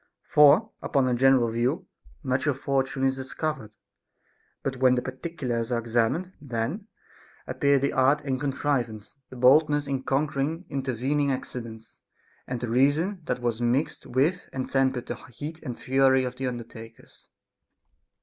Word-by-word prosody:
For, 150 +10 +5
upon 135 -3 +1
a 125 - +1
general 125 -2 +4
view, 130 +11 -1 0.4
much 130 +2 0
of 140 -3 +1
fortune 135 -1 -1
is 135 0 +2
discovered; 130 -4 -4 0.9
but 135 -1 -2
when 130 0 +4
the 125 - 0
particulars 130 -4 -4
are 120 - +1
ex 115 0 -9
amined, 130 +11 +1
then 140 - -3 0.6
appear 140 0 +2
the 140 +1 0
art 135 +3 +3
and 135 -2 -2
contrivance, 130 -6 -2
the - - -11
boldness 145 +4 +4
in 135 -2 -2
conquering 145 +5 -1
intervening 135 +2 -1
accidents, 115 -4 -7 0.5
and 125 -1 -3
the 120 - -4
reason 150 - +2
that 125 - -3
was 120 -1 -1
mixed 125 +6 0
with 150 +9 0
and 130 -1 -4
tempered 130 -2 +1
the - - -5 0.2
heat 155 +2 -6
and 125 -2 -6
fury 130 0 +3
of 125 0 -4
the 130 0 -3
undertakers. 115 -2 -9
130 Hz, 150 wpm, -26 LUFS, 120-145 Hz, 0.9 s, For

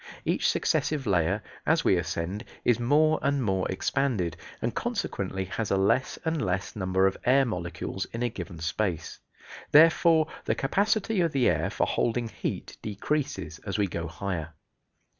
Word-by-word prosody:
Each - - +2
successive 150 -3 0
layer, 95 0 +1 0.2
as - - +2
we - - +4
ascend, 90 +6 -2 0.2
is 120 -1 +3
more 155 +6 +3
and 140 -1 +1
more 95 -3 0
expanded, 105 - 0 0.2
and 115 - -2
consequently 100 - -2
has 105 +3 -3
a 100 - +2
less 100 +7 +2
and 160 -1 0
less 95 0 -2
number 95 -1 +1
of 95 - +1
air 135 +3 +4
molecules 90 -2 -4
in 115 +1 -5
a 120 - +1
given 90 -5 -7
space. 85 0 -2 0.5
Therefore 160 +1 +6 0.2
the - - +1
capacity 205 +6 +1
of 165 -2 +1
the 135 -3 +3
air - - +1
for - - 0
holding 120 0 0
heat - - -5
decreases 100 - -3
as 100 -3 -4
we 105 - +2
go 85 -3 -4
higher. 85 -2 -4
105 Hz, 160 wpm, -27 LUFS, 95-140 Hz, 0.5 s, Therefore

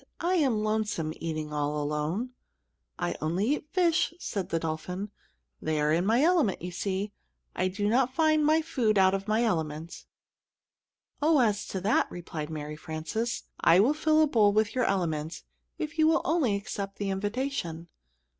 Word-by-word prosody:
I 350 +2 +1
am 250 -9 +2
lonesome, 215 -7 -1
eating 155 -2 -4
all 150 0 -1
alone." 150 +11 -2 0.7
"I - - -1
eat - - -5
only 190 - +1
fish," 345 -1 +2
said 200 - -4
the 165 - 0
dolphin. 175 +5 -4 0.5
"They 155 -1 -1
are 150 +1 +2
in 175 +4 +1
my 235 +5 +4
element, 320 - +3
you 180 - -4
see. 195 +3 -2 0.4
I 185 - +1
do 200 +2 -2
not 255 +3 +2
find 310 -1 +3
my 310 +2 +3
food 230 -9 +1
out 190 0 +5
of 195 +1 -2
my 215 +2 +2
element." 160 -6 -3 1.1
"Oh, 310 +1 +4
as 215 -5 +1
to 190 - -4
that," 205 +5 +2
replied 160 -3 -6
Mary 150 -1 -5
Frances, 160 +10 -3 0.2
"I 170 - +5
will 240 +9 +4
fill 310 0 +3
a - - +3
bowl 215 -7 +4
with 215 0 +2
your 255 -1 +1
element, 165 -5 -1 0.3
if 315 +1 -5
you 315 - +6
will 325 +1 +3
only 300 -11 +2
accept 200 -1 -5
the 200 -1 -2
invitation." 205 -5 -3
205 Hz, 170 wpm, -28 LUFS, 165-260 Hz, 1.1 s, you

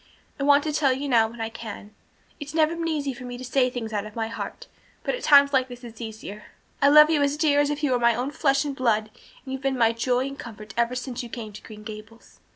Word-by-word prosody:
I - - -1
want 285 0 +5
to 310 - -2
tell 285 -3 +3
you 275 +2 -4
now 230 -4 +4
when 235 +1 -12
I 225 - -2
can. 215 -2 -9 0.5
It's 295 +1 -7
never 320 +1 +3
been 335 0 -3
easy 290 -4 -1
for 250 +1 -11
me 245 0 -6
to 255 - -8
say 255 0 +2
things 230 -3 -5
out 210 0 -2
of 215 - -13
my 225 -1 -2
heart, 230 - -6 0.4
but - - -1
at - - -4
times 280 -2 +6
like 260 -1 +3
this 245 0 -11
it's 230 -1 -10
easier. 215 -2 -8 0.4
I 280 - +6
love 300 +2 +8
you 300 -2 +2
as 285 +1 +1
dear 300 -2 +3
as 290 0 +2
if 295 +1 -3
you 285 - +2
were 250 - +2
my 235 -1 +4
own 250 +4 -2
flesh 275 -1 +1
and 280 -2 -3
blood 220 -4 +1 0.3
and 265 - -5
you've 265 - -5
been 270 -1 0
my 230 -2 +4
joy 245 +2 0
and 275 0 -7
comfort 215 -3 -9
ever 235 +1 +1
since 250 0 -4
you 240 - -8
came 220 -3 -7
to 210 - -10
Green 210 -1 -12
Gables." 215 +1 -11
250 Hz, 270 wpm, -25 LUFS, 225-285 Hz, 0.5 s, love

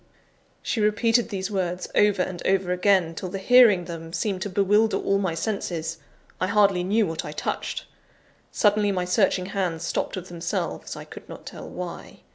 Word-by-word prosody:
She 225 - -1
repeated 225 +3 +2
these 195 -1 -3
words 180 -2 -2
over 205 -3 +3
and 180 -2 -6
over 190 -1 +2
again, 180 -2 +3
till 180 +3 -5
the 195 - -4
hearing 210 -3 +6
them 165 -1 -8
seemed 195 -2 -1
to 205 - -2
bewilder 205 +3 +3
all 195 0 +1
my 185 -4 -1
senses. 165 -5 -3 0.4
I 185 - +1
hardly 200 -3 +3
knew 210 +4 +2
what 165 -3 -3
I - - -6
touched. - - -3 0.7
Suddenly, 210 -1 +3
my 180 -2 -1
searching 185 0 +2
hands 175 -4 -1
stopped - - -2
of 185 0 -6
themselves, 170 -1 -4
I - - -8
could - - -12
not - - -10
tell - - -8
why. - - -8
190 Hz, 175 wpm, -25 LUFS, 180-210 Hz, 0.7 s, hearing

